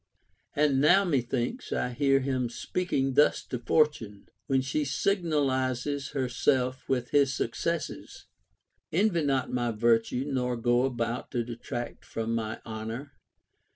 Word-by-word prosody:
2. 145 - 0
And 140 -3 +3
now, 180 +7 +6
methinks, 135 - -1
I - - 0
hear 135 +2 +3
him 130 -2 -1
speaking 135 0 -1
thus 150 +3 +3
to 125 - -4
For 150 +6 +4
tune, 110 -9 -11 0.2
when 135 -1 +2
she 135 +3 -1
signalizes 140 -5 0
herself 130 -1 0
Avith 125 -2 0
his 140 -2 +3
successes: 165 +8 -3 0.3
— - - -51
Envy 180 0 +2
not 135 -3 0
my 120 -1 0
virtue, 115 +3 +2
nor 125 -3 -1
go 120 +2 +2
about 120 -2 -2
to 120 -2 0
detract 120 +1 -6
from 115 0 -3
my 110 -1 -2
honor. 115 +5 -6
130 Hz, 140 wpm, -28 LUFS, 120-145 Hz, 0.3 s, now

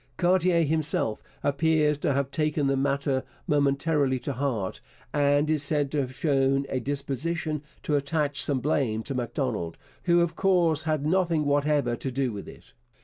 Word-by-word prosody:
Cartier 175 -1 +3
himself 150 -7 0 0.2
appears 150 +1 +2
to 145 - +1
have 140 0 -1
taken 150 -1 0
the 135 0 +2
matter 140 0 0 0.2
momentarily 140 -1 +1
to 140 - -3
heart, 120 -8 -2 0.3
and 145 0 +3
is 155 -2 +1
said 145 -1 +1
to 150 - 0
have 130 -1 -4
shown 135 -2 +1
a 130 - -1
disposition 145 +4 -2 0.2
to 150 - 0
attach 145 0 0
some 135 -3 +1
blame 125 -7 0
to 135 - -4
Macdonald, 120 - -2 0.3
who, 175 -1 +4
of 170 -1 0
course, 170 -5 +2
had 155 -2 0
nothing 165 -2 +2
whatever 145 -3 +1
to 135 - -4
do 130 -1 -1
with 100 - -7
it. - - -14
145 Hz, 160 wpm, -27 LUFS, 135-155 Hz, 0.3 s, who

